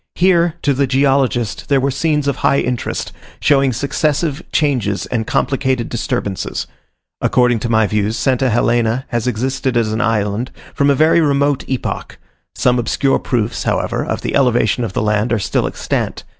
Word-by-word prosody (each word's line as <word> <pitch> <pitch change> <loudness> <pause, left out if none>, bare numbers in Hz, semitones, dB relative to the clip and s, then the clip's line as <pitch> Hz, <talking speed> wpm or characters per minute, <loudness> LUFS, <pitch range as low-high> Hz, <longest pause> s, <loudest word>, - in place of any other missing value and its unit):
Here, 175 -2 +3
to 145 - +2
the 135 +1 +1
geologist, 135 -4 +1
there 140 -1 +4
were 135 +1 0
scenes 150 +1 0
of 140 - 0
high 140 - +2
interest, 125 -1 -3 0.3
showing 135 -2 +3
successive 145 +4 -1
changes 125 -10 0
and 115 -3 -3
complicated 130 -3 0
disturbances. 120 -5 -3 0.6
According 120 -2 +2
to 120 - -3
my 110 -1 +3
views, 105 +2 -1
St. 130 -2 +1
Helena 120 0 +1
has 120 0 -2
existed 130 +1 -1
as 110 -2 +1
an 110 - -1
island 110 +1 0 0.2
from 140 0 +2
a 140 - +4
very 160 +4 +4
remote 140 -2 +1
epoch: 130 -2 -4 0.4
some 125 0 +2
obscure 135 +3 +1
proofs, 115 -2 -2
however, - - -1
of - - -3
the - - -3
elevation 125 -3 +2
of 110 - -4
the - - -1
land 105 +2 0
are 120 - +2
still 100 - 0
extant. - - -3
125 Hz, 165 wpm, -17 LUFS, 115-140 Hz, 0.6 s, there